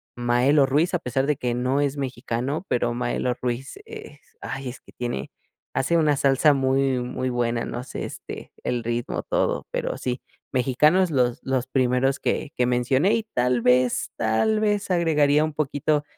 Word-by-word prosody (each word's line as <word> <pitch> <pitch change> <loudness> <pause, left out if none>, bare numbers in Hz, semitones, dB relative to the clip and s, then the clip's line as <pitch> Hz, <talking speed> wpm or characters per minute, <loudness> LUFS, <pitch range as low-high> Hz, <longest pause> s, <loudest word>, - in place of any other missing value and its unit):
Maelo 125 +4 +3
Ruiz, 150 +7 +1
a 180 - +2
pesar 135 -2 -1
de 150 - +2
que 125 -2 -2
no 130 +3 0
es 145 0 -1
mexicano, 130 +4 -3
pero 120 -1 +1
Maelo 125 +1 -1
Ruiz 125 - -3
es, 445 0 -10 0.2
ay 135 -2 -5
es 125 - -9
que - - -19
tiene 120 - -4 0.4
hace 170 +6 +2
una 155 -3 +3
salsa 140 +2 +4
muy, 135 -1 +1
muy 130 +1 -3
buena, 120 -1 -1
no 120 +1 -5
sé, - - -6
este, - - -8
el 120 -1 -1
ritmo, 120 +1 -2
todo, - - -1
pero - - -2
sí. 125 0 -3 0.3
Mexicano 140 +8 +3
los 125 -2 +1
los 130 -2 -1
primeros 130 +1 +1
que 145 - -1
que 125 - +3
mencioné 130 - +2
y 230 - -1
tal 125 0 +2
vez 125 +1 +3
tal 115 - +2
vez 205 -2 0
agregaría 150 -4 +3
un 155 - -4
poquito 145 0 0
130 Hz, 170 wpm, -24 LUFS, 125-150 Hz, 0.4 s, salsa